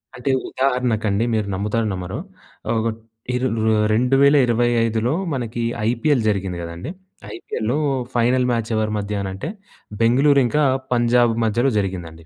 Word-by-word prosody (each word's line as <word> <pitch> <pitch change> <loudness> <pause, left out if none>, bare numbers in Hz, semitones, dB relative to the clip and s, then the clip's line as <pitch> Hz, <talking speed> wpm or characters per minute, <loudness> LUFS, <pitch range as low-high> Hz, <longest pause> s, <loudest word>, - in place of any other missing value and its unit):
అంటే 125 +2 -1 0.2
ఉదాహరణకండి 120 -6 0
మీరు 110 -2 0
నమ్ముతారో 105 +4 -1
నమ్మరో. 95 +5 -5 0.6
ఒక 110 +1 0 0.5
ఇరు 125 +1 0 0.3
ఆహ్, 105 0 +2
2025లో 120 -2 +3 0.2
మనకి 120 -3 -3 0.3
ఐపీఎల్ 125 +3 +1
జరిగింది 95 -3 -2
కదండీ! 85 - -7 0.5
ఐపీఎల్ 110 0 -4 0.4
ఫైనల్ 125 +2 +2
మ్యాచ్ 115 -2 -1
ఎవరి 110 0 0
మధ్యన 100 -1 -3
అంటే 115 +12 -5 0.5
బెంగుళూరు 135 +5 +4
ఇంకా 150 +5 +1 0.3
పంజాబ్ 120 -1 +3
మధ్యలో 120 +5 +1
జరిగిందండి. 85 -4 -5
115 Hz, 120 wpm, -21 LUFS, 105-125 Hz, 0.6 s, బెంగుళూరు